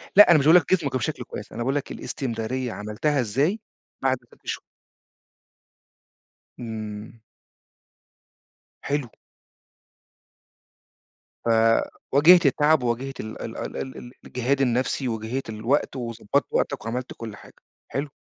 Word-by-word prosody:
لا، 210 -2 +10
أنا 155 - +7
مش 140 - 0
باقول 160 +3 +8
لك - - -8
جسمك 170 -4 +3
يبقى 130 -2 0
بشكل 115 - -3
كويس، - - -8
أنا 120 - -4
باقول 135 +3 0
لك 145 - -2
الإستمرارية 125 0 -3
عملتها 105 +8 -1
إزاي 140 - +1 0.4
بَعد 130 -1 +3 0.2
6 - - -20
شهور؟ - - -3 2.0
إمم. 110 -1 -7 1.6
حلو. 140 -4 -2 2.4
ف - - +1 0.6
واجهت 165 +4 +7
التعب 145 +1 +4
وواجهت 125 +3 -2
ال 110 0 -6
ال - - -6
ال - - -5
ال 130 - -5
ال 120 - -9
الجِهاد 130 +3 0
النفسي، 125 +1 +1
واجهت 115 +2 -3
الوقت 115 +7 0
وضبّطت 120 +1 -1
وقتَك - - -1
وعملت 125 +2 -3
كلّ 110 -3 -7
حاجة، - - -15 0.3
حلو. 140 +2 -3
125 Hz, 130 wpm, -25 LUFS, 115-140 Hz, 2.4 s, لا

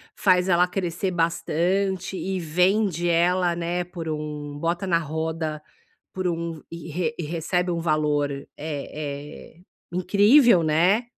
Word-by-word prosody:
faz 185 -1 +3
ela 180 0 +4
crescer 180 0 -2
bastante 175 +3 0
e 190 0 -2
vende 180 +2 +1
ela, 175 +1 +2
né, 175 +1 -2
por 175 -2 -7
um 150 -1 -5
bota 170 +4 -1
na 170 - +3
roda, 160 0 -3 0.5
por 185 -1 -2
um 165 -2 -3
e 170 +5 -3
e - - -2
recebe 175 +3 -1
um 170 - -1
valor, 150 -3 +1
é 140 0 -6
é, 145 0 -6 0.4
incrível, 200 - +5
né 175 +9 +3
170 Hz, 130 wpm, -24 LUFS, 155-180 Hz, 0.5 s, incrível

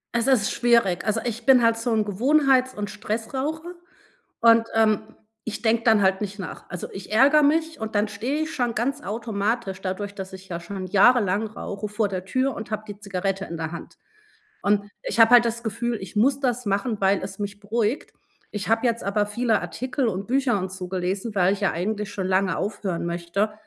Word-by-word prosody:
Es 235 +2 +1
ist 240 -6 +3
schwierig. 235 -7 +2
Also, 220 +1 0
ich 235 -1 -4
bin 260 -3 +6
halt 230 0 +4
so 235 +1 -2
'n 220 -2 +2
Gewohnheits 260 +4 +3
und 205 -1 -4
Stressraucher 265 +11 -4 0.7
und, 230 0 +6
ähm, 220 0 +2 0.3
ich 225 - -5
denke 225 0 +2
dann 220 -3 +5
halt 190 0 +3
nicht 205 0 -5
nach. 185 -4 -7
Also, 180 - -5
ich 195 +2 -8
ärgere 285 +6 +6
mich 320 +2 +1
und 220 -1 -5
dann 210 +1 +2
stehe 250 +9 -2
ich 315 - -6
schon 240 -3 -1
ganz 275 +6 -1
automatisch 215 -3 -2
dadurch, 200 +2 -4
dass 190 -1 -7
ich 190 0 -11
ja 170 -1 -4
schon 185 +2 -6
jahrelang 205 0 +4
rauche 210 -1 -6
vor 210 0 -1
der 185 -1 -4
Tür 260 +6 0
und 220 0 -7
habe 215 0 -3
die 205 0 -8
Zigarette 195 -1 -2
in 170 - -6
der 160 0 -4
Hand. 170 - -9 0.7
Und 205 0 +1
ich 230 - -2
habe 225 +2 +7
halt 240 -1 +8
das 235 0 -2
Gefühl, 235 +2 -2
ich 190 - -9
muss 270 +6 +3
das 250 -2 -1
machen, 205 +2 0
weil 195 0 +3
es 195 0 -7
mich 205 0 -5
beruhigt. 220 +5 -2 0.4
Ich 210 0 -5
habe 225 +2 +3
jetzt 235 0 -1
aber 205 +1 +1
viele 220 +1 +1
Artikel 250 - -2
und 195 0 -3
Bücher 255 -3 +1
und 185 0 -4
so 185 -1 -6
gelesen, 190 +4 -3
weil 185 0 +3
ich 200 - -3
ja 195 - +1
eigentlich 210 +4 -3
schon 190 -2 -3
lange 190 0 +1
aufhören 200 -5 -3
möchte, 170 +5 -1
215 Hz, 205 wpm, -24 LUFS, 195-235 Hz, 0.7 s, halt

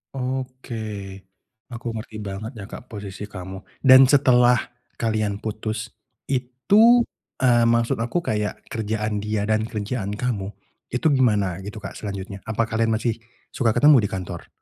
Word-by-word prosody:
Oke 130 -2 -4 0.9
aku 120 -1 -7
ngerti 110 0 -7
banget 100 +3 -5
ya 105 - -7
Kak 125 - -9
posisi 100 -1 -7
kamu. 95 -2 -8 0.3
Dan 130 -1 +9
setelah 125 -3 +5 0.4
kalian 110 -3 -1
putus 110 +1 -4 0.4
itu, 200 - +4 0.4
eee, 120 -2 +5
maksud 115 -1 +2
aku 125 +9 -1
kayak 105 -1 -2
kerjaan 105 -1 -2
dia 105 0 -1
dan 110 +1 +1
kerjaan 105 -2 -3
kamu, 105 -4 -3 0.3
itu 125 +6 0
gimana 105 -9 +2
gitu 105 +1 -8
Kak - - -7
selanjutnya 100 -1 -6
apa 110 +1 +1
kalian 115 0 +1
masih 115 0 -1 0.3
suka 115 -4 +1
ketemu 145 -1 +7
di 105 - +1
kantor? 90 -3 -6
110 Hz, 140 wpm, -23 LUFS, 105-125 Hz, 0.9 s, Dan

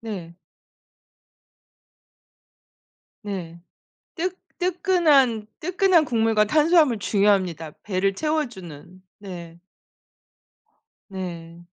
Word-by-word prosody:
네. 190 -7 -7 2.9
네 180 -5 -6 0.6
뜨 360 +2 -1 0.3
뜨끈한, 335 - +2
뜨끈한 365 -1 +3
국물과 225 -4 +2
탄수화물 305 -1 +3
중요합니다. 190 -6 +1
배를 195 0 0
채워주는. 190 - -4 0.2
네. 175 -4 -9 1.5
네 170 -3 -8
210 Hz, 150 characters per minute, -23 LUFS, -, 2.9 s, 뜨끈한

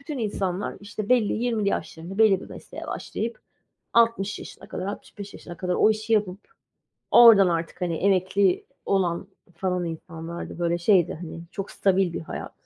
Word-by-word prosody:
bütün 285 0 -6
insanlar, 200 -4 -2
işte, 205 0 -6
belli 245 -4 +3
20'li 225 -3 0
yaşlarında 180 0 -4
belli 210 -4 +5
bir - - -10
mesleğe - - -9
başlayıp 230 +1 -4 0.5
60 230 -3 +3
yaşına - - -11
kadar, 185 - -4
65 200 0 -7
yaşına 175 - -10
kadar 180 +1 -1
o 215 - +5
işi 215 +1 -2
yapıp 200 -4 +1 0.7
oradan 225 -5 +9
artık, 170 +1 -2
hani, 175 -2 0
emekli 190 0 +2 0.2
olan 190 -1 0 0.3
falan 180 0 -1
insanlardı. 165 +1 -7
Böyle 170 0 +1
şeydi, 175 0 +3
hani, 165 -1 -7
çok 195 0 -5
stabil 190 -2 +2
bir - - -3
hayat. 160 - -7
195 Hz, 155 wpm, -25 LUFS, 175-215 Hz, 0.7 s, oradan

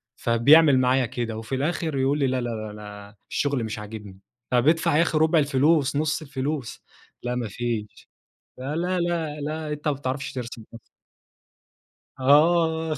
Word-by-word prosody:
فبيعمل 135 +4 +5
معايا 130 0 +2
كده 115 -1 -4
وفي 115 +4 -4
الآخر 155 +2 -2
يقول 135 +2 +1
لي 140 - +2
لا، 130 0 -1
لا، 120 - -3
لا، 110 -2 -5
أنا 105 0 -11
الشغل 140 -4 -1
مش 110 -1 -4
عاجبني. 105 -2 -9 0.3
طب 125 +2 +2
ادفع 160 -2 +3
يا 165 - +5
أخي 160 -2 +1
ربع 160 +1 +4
الفلوس، 140 0 +2
نص 155 +2 0
الفلوس، 140 -2 -4 0.4
لأ 125 0 -2
ما 120 -2 -2
فيش. 110 0 -5 0.5
لا، 135 +4 -4
لا، 180 +2 -1
لا، 165 -3 -2
لا 155 +1 -4
أنت 150 +1 -5
ما 150 - +2
بتعرفش 135 0 -4
ترسم 120 -2 -6
أصلًا. 115 - -10 1.4
آه، 160 +3 +3
135 Hz, 160 wpm, -24 LUFS, 120-155 Hz, 1.4 s, فبيعمل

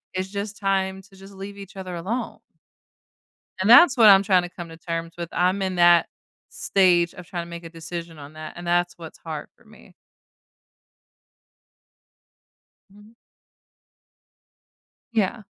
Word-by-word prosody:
it's 185 +1 -3
just 205 +1 -5
time 190 -1 -1
to 195 0 -20
just 195 +1 -14
leave 195 +1 -8
each 195 0 -12
other 185 -1 -7
alone. 210 +9 -4 1.2
And 190 - 0
that's 265 +3 +8
what 225 -2 +7
I'm 195 0 +7
trying 185 -3 +3
to 175 - -6
come 175 -1 -9
to 165 - -12
terms 165 0 -5
with 170 -1 -5
I'm 185 +2 +1
in 190 -1 -2
that 175 -1 +5 0.4
stage 175 -3 +2
of 180 - -11
trying 175 -1 -5
to - - -13
make 170 0 -8
a 165 - -9
decision 165 0 -8
on 145 +1 -11
that, 155 0 -9
and 175 0 -9
that's 175 0 +1
what's 165 -2 -11
hard 155 -3 -7
for - - -26
me. 215 -3 -18 3.0
Mhm. 205 +3 -19 2.0
Yeah. 220 0 0
185 Hz, 150 wpm, -23 LUFS, 170-200 Hz, 3.0 s, that's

